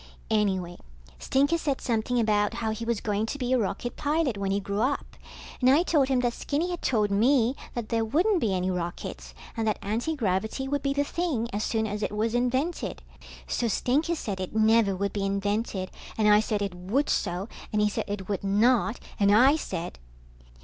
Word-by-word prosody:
Anyway, 190 -5 0 0.4
Stinker 285 - +2
said 280 -4 -1
something 240 0 0
about 210 -1 +2
how 225 -2 -1
he 220 +1 -4
was 235 -2 0
going 210 0 -1
to 285 - -4
be 255 -2 -1
a 255 - +3
rocket 235 +3 -2
pilot 295 -4 0
when 200 -1 -2
he 200 +1 +1
grew 200 +1 -2
up, 270 +4 -1 0.5
and 255 - +5
I 290 +6 +5
told 295 -7 +2
him 260 -2 +2
that 240 -1 0
Skinny 315 +8 -2
had 350 - -4
told 210 -5 +1
me 240 +4 +3 0.2
that 235 -3 -4
there 225 -1 +1
wouldn't 340 - +2
be 215 - +1
any 185 0 0
rockets, 170 - -5 0.2
and 225 -1 -1
that 215 - +1
antigravity 220 0 -1
would 285 0 -1
be 275 - 0
the 285 0 +1
thing 290 -7 -1
as 205 +1 -1
soon 220 0 0
as 210 0 -3
it - - -1
was 220 +2 0
invented. 250 - -1 0.4
So 235 - -1
Stinker 290 - +1
said 205 - -4
it 185 +2 -5
never 220 -2 +4
would 200 +2 -2
be 200 - -2
invented, 200 0 -1 0.3
and 215 -1 +3
I 210 0 +7
said 210 -1 -1
it 200 -2 -3
would 195 +12 -1
so, 180 +4 -1 0.2
and 210 - +1
he 210 - +4
said 205 - -2
it 200 -2 -4
would 200 -2 -2
not, 220 +3 +2 0.2
and 200 -1 +4
I 255 +8 +6
said 175 - -5
220 Hz, 200 wpm, -27 LUFS, 200-260 Hz, 0.5 s, I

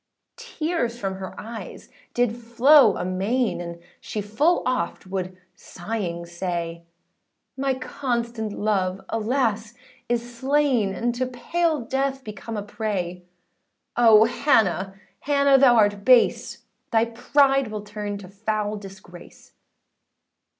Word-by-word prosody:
Tears 330 - -3
from 195 -4 -3
her 190 -1 -8
eyes 225 +1 -9 0.3
did 240 -2 +1
flow 245 +5 +5
amain, 195 +5 -1
And 170 -1 -7 0.2
she 215 - -5
full 220 - +1
oft 250 -10 -2
would 185 -1 -4 0.2
sighing 175 -3 -5
say, 170 -1 -4 0.7
âMy 270 -1 -1
constant 235 -5 -3
love, 195 -3 -1
alas! 225 -1 -1 0.3
is 240 0 -2
slain, 260 -6 +1
And 240 +5 -1
to 250 +1 -2
pale 315 +4 -1
death, 270 +2 -2
become 220 0 -7
a 205 - -3
prey: 185 -5 -4 0.7
Oh, 225 -2 +7
Hannah, 215 - +1 0.2
Hannah 280 -1 +3
thou 255 -3 +6
art 205 -2 +3
base; 250 0 +3 0.3
Thy 225 0 +3
pride 270 +3 +2
will 215 -1 -6
turn 210 -1 -5
to 200 -2 -10
foul 210 +1 -3
disgrace! 190 -3 -13
225 Hz, 115 wpm, -24 LUFS, 195-255 Hz, 0.7 s, Oh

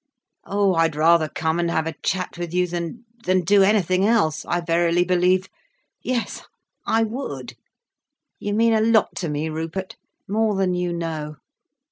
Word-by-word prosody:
Oh, 200 -1 +1
I'd 165 -2 +2
rather 160 0 +4
come 160 +1 -1
and 170 -1 0
have 160 -1 0
a 160 - -3
chat 185 -1 -1
with 175 0 -4
you 180 0 +3
than—than 185 +3 -3
do 200 +3 +4
anything 190 -2 +3
else, 200 -8 +2
I 175 - 0
verily 170 +1 +2
believe. 185 +1 +2 0.5
Yes, 245 -3 -2 0.5
I 225 0 +3
would. 145 - -5 0.9
You 205 0 -2
mean 230 +1 +3
a 220 - +3
lot 220 -1 +3
to 170 - -2
me, 150 +2 -2
Rupert, 165 +4 -5 0.3
more 215 +1 +1
than 190 -1 +1
you 180 0 -1
know." 160 -3 -4
180 Hz, 155 wpm, -22 LUFS, 165-205 Hz, 0.9 s, rather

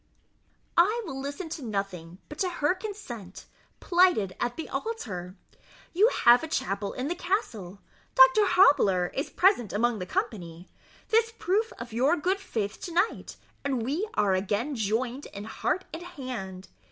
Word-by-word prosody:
"I 430 +7 +3
will 270 -6 -5
listen 285 +6 -5
to 315 -3 -6
nothing 195 -6 -4
but 300 - -10
to 370 - +1
her 320 -2 +1
consent, 370 - -8 0.3
plighted 350 - +3
at 240 0 -2
the 325 - -5
altar. 195 - -5 0.6
You 400 +6 +5 0.2
have 240 +1 +8
a 320 - -4
chapel 200 - -2
in 255 +2 -3
the 340 - 0
castle 225 - -3 0.3
Doctor - - +7
Hobbler 195 - +4
is 275 - -2
present 360 - +3
among 230 +1 +1
the 180 - -5
company 175 -3 -4 0.4
this 450 0 +3
proof 430 +5 0
of 235 -1 -8
your 270 +9 +3
good 370 +6 0
faith 220 - -4
to 350 - -6
night, 360 +6 -1 0.3
and 265 -5 -1
we 315 - -2
are 200 -2 +3
again 205 +9 -1
joined 235 +5 -1
in 200 - -8
heart 300 - -2
and 325 - -5
hand. 250 - -7
260 Hz, 155 wpm, -27 LUFS, -, 0.6 s, have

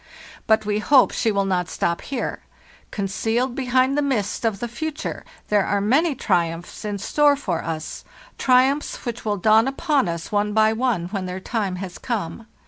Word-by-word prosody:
But 220 -1 +3
we 210 0 0
hope 260 +4 +5
she 225 - +1
will 200 -1 +1
not 180 -2 0
stop 170 0 -1
here; 260 -3 -4 0.5
concealed 225 +5 -1
behind 260 +1 +2
the 295 - +2
mist 255 -9 -1
of 215 -4 0
the 240 - -3
future 300 +6 -5 0.3
there 205 -1 +3
are 200 +1 0
many 275 +10 +2
triumphs 170 -1 -1
in 205 -1 -3
store 290 +8 +3
for 185 - -3
us—triumphs 255 - -1
which 240 0 -4
will 210 -1 0
dawn 220 +5 +4
upon 275 - +1
us 170 0 -5
one 210 0 +1
by 220 0 +4
one 220 -7 0
when 190 -2 -3
their 180 +1 -4
time 200 -2 -2
has 180 0 -7
come. 225 -2 -4
220 Hz, 170 wpm, -22 LUFS, 195-260 Hz, 0.5 s, hope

